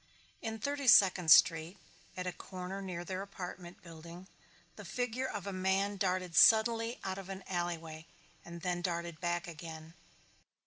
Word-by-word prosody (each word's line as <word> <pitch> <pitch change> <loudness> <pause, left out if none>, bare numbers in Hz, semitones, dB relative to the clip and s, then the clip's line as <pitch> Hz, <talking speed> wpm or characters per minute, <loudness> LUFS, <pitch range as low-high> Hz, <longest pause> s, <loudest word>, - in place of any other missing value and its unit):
In 225 -1 -4
Thirty 280 +4 -3
Second 190 -6 +6
Street, 165 +3 +6 0.4
at 180 - -3
a 180 - -2
corner 185 +2 -7
near 175 -2 -5
their 185 +1 -4
apartment 180 -2 -9
building, 170 +1 -11 0.5
the 210 - -10
figure 245 +6 -3
of 205 -6 -6
a 200 - -4
man 190 +2 0
darted 185 -3 -1
suddenly 230 +1 +5
out 190 0 -3
of 195 -1 -10
an 195 0 -7
alleyway 165 -3 -4 0.4
and 170 0 -10
then 175 -1 -1
darted 170 -2 -4
back 175 0 -1
again. 160 -1 -9
185 Hz, 150 wpm, -33 LUFS, 170-200 Hz, 0.5 s, Second